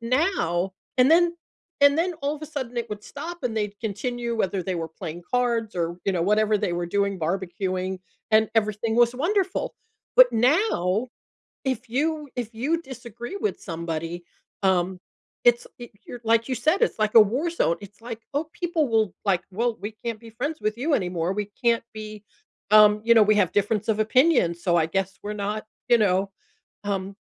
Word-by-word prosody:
now 230 Hz, -, 0 dB, 0.2 s
and 255 Hz, +3 st, +5 dB
then 345 Hz, +1 st, +4 dB, 0.4 s
and 285 Hz, +2 st, +6 dB
then 355 Hz, +1 st, +1 dB
all 285 Hz, +2 st, 0 dB
of 295 Hz, -, -15 dB
a -, -, -5 dB
sudden, 260 Hz, -5 st, -5 dB
it 235 Hz, -1 st, -2 dB
would 210 Hz, -1 st, -7 dB
stop, 335 Hz, +5 st, -7 dB
and 240 Hz, -3 st, -2 dB
they'd 210 Hz, -1 st, -2 dB
continue, 235 Hz, +2 st, -3 dB
whether 190 Hz, -3 st, 0 dB
they 185 Hz, -1 st, -2 dB
were 165 Hz, -1 st, -3 dB
playing 170 Hz, +1 st, -8 dB
cards 235 Hz, -4 st, 0 dB
or, 170 Hz, 0 st, -1 dB
you 195 Hz, -, +2 dB
know, 170 Hz, -2 st, 0 dB
whatever 210 Hz, +2 st, +2 dB
they 175 Hz, -, -1 dB
were 175 Hz, 0 st, -2 dB
doing, 200 Hz, +1 st, 0 dB
barbecuing, 185 Hz, +2 st, -2 dB, 0.3 s
and 215 Hz, 0 st, +5 dB
everything 220 Hz, +1 st, +1 dB
was 240 Hz, 0 st, +4 dB
wonderful. 375 Hz, +7 st, 0 dB, 0.4 s
But -, -, +9 dB
now, 240 Hz, -, +2 dB, 0.6 s
if 255 Hz, -2 st, -2 dB
you 300 Hz, +3 st, -1 dB
if 235 Hz, -2 st, -4 dB
you 295 Hz, +9 st, 0 dB
disagree 240 Hz, -, -8 dB
with 425 Hz, +1 st, -2 dB
somebody, 165 Hz, +1 st, -5 dB, 0.4 s
um, 185 Hz, -1 st, +1 dB, 0.5 s
it's 240 Hz, 0 st, +4 dB
eh 240 Hz, -, -8 dB, 0.2 s
you're 245 Hz, -, -8 dB
like 230 Hz, +2 st, +2 dB
you 255 Hz, -, 0 dB
said, 310 Hz, -, +1 dB
it's 470 Hz, -, +2 dB
like 215 Hz, 0 st, 0 dB
a 230 Hz, -, +10 dB
war 250 Hz, +11 st, +2 dB
zone. 170 Hz, -, +1 dB
It's 205 Hz, +1 st, -13 dB
like 230 Hz, -1 st, -7 dB
oh, 305 Hz, +2 st, -1 dB
people 335 Hz, -5 st, 0 dB
will, 220 Hz, -5 st, +1 dB
like, 190 Hz, -3 st, +2 dB
"Well, 230 Hz, +4 st, -1 dB
we 205 Hz, +3 st, -5 dB
can't 230 Hz, -2 st, -3 dB
be 230 Hz, -1 st, -12 dB
friends 285 Hz, +8 st, -4 dB
with 215 Hz, +2 st, -1 dB
you 290 Hz, +4 st, +1 dB
anymore, 180 Hz, -5 st, -1 dB
we 210 Hz, 0 st, -3 dB
can't 235 Hz, -1 st, +2 dB
be" 215 Hz, -1 st, -8 dB, 0.5 s
um, 210 Hz, 0 st, +7 dB
you 235 Hz, -, +5 dB
know, 225 Hz, -, +7 dB
"We 215 Hz, +1 st, +4 dB
have 190 Hz, -4 st, +2 dB
difference 205 Hz, +1 st, 0 dB
of 220 Hz, -1 st, +1 dB
opinions, 215 Hz, -, +3 dB
so 175 Hz, -3 st, +2 dB
I 160 Hz, -2 st, +3 dB
guess 190 Hz, +2 st, -2 dB
we're 210 Hz, +1 st, -4 dB
not" 210 Hz, +1 st, -3 dB, 0.2 s
you 240 Hz, -, +7 dB
know? 195 Hz, -1 st, +2 dB, 0.5 s
Um, 195 Hz, -1 st, -3 dB
220 Hz, 190 wpm, -25 LUFS, 195-250 Hz, 0.6 s, a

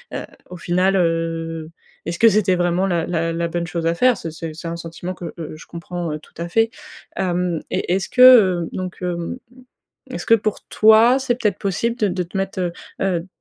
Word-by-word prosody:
heu, -, -, -4 dB, 0.2 s
au 180 Hz, -, -8 dB
final, 180 Hz, +3 st, +1 dB
heu. 165 Hz, -2 st, -1 dB, 0.4 s
Est 170 Hz, -, -2 dB
ce 175 Hz, -, -7 dB
que 230 Hz, -, +7 dB
c'était 200 Hz, -3 st, +2 dB
vraiment 175 Hz, +2 st, +1 dB
la 170 Hz, -3 st, 0 dB
la 165 Hz, -1 st, -1 dB
la 170 Hz, 0 st, -1 dB
bonne 170 Hz, 0 st, -3 dB
chose 170 Hz, -1 st, -3 dB
à 165 Hz, -, +2 dB
faire?» 250 Hz, +8 st, +3 dB
c'est 165 Hz, -, -6 dB
c'est 160 Hz, 0 st, -7 dB
c'est 165 Hz, +1 st, -6 dB
un 170 Hz, -, -4 dB
sentiment 170 Hz, +2 st, -6 dB
que, 175 Hz, -2 st, -8 dB
heu, 155 Hz, -2 st, -7 dB
je 160 Hz, -, -13 dB
comprends 170 Hz, 0 st, -5 dB
heu, 155 Hz, -, -5 dB
tout -, -, -21 dB
à 170 Hz, -, -4 dB
fait. 225 Hz, +6 st, +2 dB, 0.5 s
Hem, 180 Hz, -2 st, -1 dB
et 175 Hz, -, -1 dB
est-ce 190 Hz, +1 st, -1 dB
que 225 Hz, -9 st, +7 dB
donc, 185 Hz, -1 st, -5 dB
hem, 175 Hz, +5 st, -3 dB, 0.7 s
est-ce -, -, -5 dB
que 230 Hz, -, +6 dB
pour 215 Hz, -1 st, -1 dB
toi 220 Hz, +4 st, +5 dB
c'est, 260 Hz, -2 st, 0 dB
peut-être, 210 Hz, -6 st, -1 dB
possible 230 Hz, +4 st, -1 dB
de 215 Hz, -, +1 dB
de 180 Hz, 0 st, -1 dB
te 175 Hz, +3 st, -8 dB
mettre, 195 Hz, 0 st, -2 dB
heu, 175 Hz, -1 st, -1 dB, 0.3 s
heu, 180 Hz, -3 st, 0 dB
175 Hz, 215 wpm, -20 LUFS, 170-195 Hz, 0.7 s, que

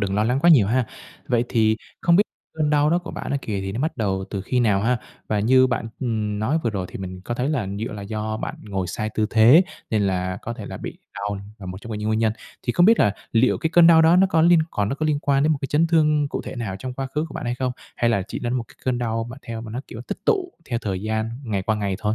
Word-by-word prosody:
đừng 100 Hz, -1 st, -1 dB
lo 105 Hz, +1 st, +2 dB
lắng 125 Hz, +4 st, +1 dB
quá 175 Hz, -, +6 dB
nhiều 125 Hz, -11 st, +6 dB
ha. 120 Hz, +3 st, +1 dB, 0.4 s
Vậy 120 Hz, -1 st, +2 dB
thì 110 Hz, -1 st, +2 dB, 0.2 s
không 170 Hz, 0 st, +4 dB
biết 200 Hz, -, +6 dB, 0.3 s
cơn 155 Hz, -2 st, 0 dB
đau 150 Hz, 0 st, +3 dB
đó 175 Hz, -, +3 dB
của 175 Hz, -, -8 dB
bạn -, -, -6 dB
á 140 Hz, -, +1 dB
kìa, 105 Hz, -3 st, -3 dB
thì 95 Hz, 0 st, -4 dB
nó 115 Hz, -, -3 dB
bắt 155 Hz, +4 st, -1 dB
đầu 95 Hz, -4 st, -1 dB
từ 100 Hz, -, -3 dB
khi 125 Hz, +5 st, 0 dB
nào 105 Hz, -5 st, +3 dB
ha? 125 Hz, +2 st, +2 dB, 0.3 s
Và 105 Hz, -1 st, +1 dB
như 130 Hz, +4 st, +5 dB
bạn, 120 Hz, -2 st, -2 dB
ừm, 110 Hz, -5 st, -1 dB
nói 130 Hz, +10 st, +1 dB
vừa 115 Hz, -, +2 dB
rồi 95 Hz, -3 st, -3 dB
thì -, -, -8 dB
mình 95 Hz, -1 st, -6 dB
có 120 Hz, +5 st, -4 dB
thấy 125 Hz, +3 st, -1 dB
là 135 Hz, -9 st, -1 dB
dựa 115 Hz, +1 st, -4 dB
là 105 Hz, -2 st, -6 dB
do 110 Hz, +1 st, -3 dB
bạn -, -, -4 dB
ngồi 95 Hz, -3 st, -3 dB
sai 110 Hz, +4 st, -3 dB
tư 110 Hz, -, +1 dB
thế, 120 Hz, +10 st, +7 dB, 0.3 s
nên 110 Hz, -2 st, +2 dB
là 95 Hz, -1 st, -1 dB
có 120 Hz, -, -4 dB
thể -, -, -8 dB
là -, -, -6 dB
bị -, -, -7 dB, 0.2 s
đau 100 Hz, 0 st, -3 dB, 0.2 s
là 95 Hz, -, -9 dB
một 90 Hz, +1 st, -6 dB
trong 115 Hz, -, -9 dB
cái 105 Hz, -, -3 dB
những 105 Hz, +1 st, -2 dB
nguyên 110 Hz, 0 st, +1 dB
nhân. 110 Hz, -1 st, +2 dB, 0.3 s
Thì 120 Hz, -, -1 dB
không 175 Hz, +6 st, +5 dB
biết 225 Hz, +1 st, +6 dB
là 105 Hz, -, +3 dB, 0.2 s
liệu 115 Hz, +3 st, +3 dB
cái 160 Hz, -, -1 dB
cơn 175 Hz, 0 st, +7 dB
đau 165 Hz, -1 st, +7 dB
đó 165 Hz, +2 st, +6 dB
nó 190 Hz, +1 st, +6 dB
có 165 Hz, -4 st, +2 dB
liên 170 Hz, +1 st, +6 dB
còn 100 Hz, -1 st, -1 dB
nó 135 Hz, -, -1 dB
có 155 Hz, +2 st, -2 dB
liên 150 Hz, -2 st, +1 dB
quan 140 Hz, -2 st, +1 dB
đến 155 Hz, +2 st, +3 dB
một 150 Hz, -, -1 dB
cái -, -, -2 dB
chấn 150 Hz, +4 st, +2 dB
thương 150 Hz, -3 st, +3 dB
cụ -, -, -4 dB
thể -, -, -7 dB
nào 105 Hz, -5 st, -4 dB
trong 130 Hz, +5 st, -5 dB
quá 135 Hz, +1 st, -3 dB
khứ 150 Hz, +4 st, -2 dB
của -, -, -12 dB
bạn -, -, -5 dB
hay 120 Hz, 0 st, -1 dB
không? 125 Hz, 0 st, -2 dB, 0.2 s
Hay 120 Hz, -, +2 dB
là 100 Hz, -4 st, +1 dB
chỉ -, -, -4 dB
đến 120 Hz, 0 st, -2 dB
một 125 Hz, -2 st, -1 dB
cái -, -, -17 dB
cơn 125 Hz, -2 st, 0 dB
đau 115 Hz, -1 st, -1 dB
mà 120 Hz, -, -8 dB
theo 115 Hz, -1 st, -6 dB
mà 115 Hz, -1 st, -8 dB
nó 120 Hz, +4 st, -4 dB
kiểu 115 Hz, -, -8 dB
tích -, -, -5 dB
tụ 375 Hz, -5 st, +1 dB
theo 120 Hz, -5 st, -2 dB
thời 95 Hz, -3 st, -3 dB
gian 110 Hz, +1 st, -1 dB
ngày 100 Hz, -5 st, -1 dB
qua 110 Hz, +2 st, 0 dB
ngày 100 Hz, -2 st, -1 dB
thôi? 105 Hz, 0 st, 0 dB
115 Hz, 305 wpm, -23 LUFS, 105-140 Hz, 0.4 s, thế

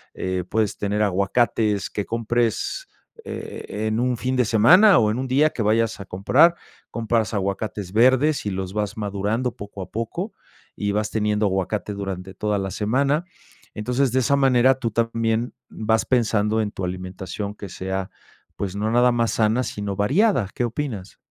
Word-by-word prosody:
eh, 95 Hz, -1 st, -2 dB
puedes 110 Hz, -2 st, 0 dB
tener 105 Hz, +1 st, 0 dB
aguacates 105 Hz, +2 st, +1 dB
que 105 Hz, -, -3 dB
compres 115 Hz, 0 st, -1 dB, 0.4 s
e 105 Hz, +1 st, -6 dB
en 110 Hz, +1 st, 0 dB
un 125 Hz, 0 st, +1 dB
fin 130 Hz, +2 st, -1 dB
de 125 Hz, -, +4 dB
semana 175 Hz, -, +6 dB
o 105 Hz, -1 st, +3 dB
en 115 Hz, -, -2 dB
un 130 Hz, -, -2 dB
día 145 Hz, +4 st, +3 dB
que 115 Hz, -, -4 dB
vayas 110 Hz, +1 st, +1 dB
a 100 Hz, -, -7 dB
comprar, 100 Hz, -, +4 dB, 0.3 s
compras 115 Hz, -2 st, -1 dB
aguacates 100 Hz, 0 st, -3 dB
verdes 130 Hz, +6 st, +3 dB
y 105 Hz, -, 0 dB
los 95 Hz, -1 st, -4 dB
vas 105 Hz, -1 st, -2 dB
madurando 105 Hz, +4 st, -1 dB
poco 100 Hz, -2 st, -8 dB
a 90 Hz, -, -12 dB
poco, 170 Hz, -, -4 dB, 0.4 s
y 100 Hz, 0 st, -2 dB
vas 105 Hz, 0 st, 0 dB
teniendo 105 Hz, -1 st, +1 dB
aguacate 95 Hz, +2 st, -2 dB
durante 95 Hz, -1 st, -5 dB
toda 105 Hz, 0 st, -1 dB
la 95 Hz, -1 st, -3 dB
semana. 135 Hz, -, +1 dB, 0.5 s
Entonces, 125 Hz, +4 st, 0 dB
de 130 Hz, -, +3 dB
esa 135 Hz, +3 st, +2 dB
manera 130 Hz, -1 st, +4 dB
tú 115 Hz, -, -1 dB
también 115 Hz, +1 st, 0 dB, 0.2 s
vas 110 Hz, 0 st, 0 dB
pensando 110 Hz, -3 st, +1 dB
en 105 Hz, -, -2 dB
tu 95 Hz, -, -4 dB
alimentación 95 Hz, +2 st, -5 dB
que 100 Hz, -, -8 dB
sea, 95 Hz, +1 st, -4 dB, 0.5 s
pues 100 Hz, -2 st, -4 dB
no 105 Hz, +1 st, 0 dB
nada 120 Hz, +1 st, +4 dB
más 115 Hz, -1 st, +1 dB
sana, 110 Hz, +3 st, +2 dB
sino 100 Hz, -4 st, -4 dB
variada, 140 Hz, -, +2 dB
¿qué -, -, -2 dB
opinas? 115 Hz, -6 st, -5 dB
110 Hz, 170 wpm, -23 LUFS, 100-120 Hz, 0.5 s, semana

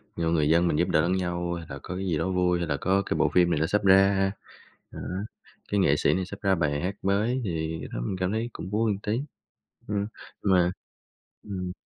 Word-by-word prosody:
nhiều 80 Hz, -1 st, 0 dB
người 75 Hz, -3 st, +2 dB
dân 85 Hz, +2 st, +4 dB
mình 75 Hz, -, +1 dB
giúp 85 Hz, -, +2 dB
đỡ 80 Hz, -, +4 dB
lẫn 85 Hz, +3 st, +1 dB
nhau, 85 Hz, -2 st, -1 dB
hay 85 Hz, -1 st, -5 dB
là 70 Hz, -1 st, -6 dB
có 90 Hz, -, -5 dB
cái 95 Hz, +1 st, -3 dB
gì 85 Hz, -4 st, 0 dB
đó 95 Hz, -, -1 dB
vui, 90 Hz, -1 st, +2 dB
hay 85 Hz, -, -2 dB
là 70 Hz, -2 st, 0 dB
có 95 Hz, +6 st, +2 dB
cái -, -, -1 dB
bộ -, -, +3 dB
phim 90 Hz, -1 st, +4 dB
này 75 Hz, -, +1 dB
nó 80 Hz, -, +1 dB
sắp 105 Hz, +3 st, +1 dB
ra, 95 Hz, 0 st, +5 dB, 0.6 s
đó, -, -, -8 dB, 0.7 s
cái 100 Hz, -, +2 dB
nghệ 70 Hz, -6 st, +4 dB
sĩ -, -, +3 dB
này 95 Hz, 0 st, -1 dB
sắp 100 Hz, +2 st, -9 dB
ra 95 Hz, -1 st, +3 dB
bài 75 Hz, -4 st, 0 dB
hát 95 Hz, +3 st, -2 dB
mới 105 Hz, +6 st, +1 dB
thì 80 Hz, -3 st, -2 dB
cái -, -, -6 dB
đó -, -, -3 dB
mình 95 Hz, -, -2 dB
cảm 90 Hz, 0 st, -1 dB
thấy 115 Hz, +2 st, -1 dB
cũng 90 Hz, -, -7 dB
vui 110 Hz, +2 st, +1 dB
một 100 Hz, -, -3 dB
tí, 105 Hz, +4 st, -1 dB, 0.7 s
ừm, 100 Hz, -1 st, -1 dB, 0.4 s
mà 90 Hz, -3 st, +4 dB, 0.7 s
ừm. 95 Hz, -3 st, -4 dB
90 Hz, 245 wpm, -27 LUFS, 85-100 Hz, 0.7 s, ra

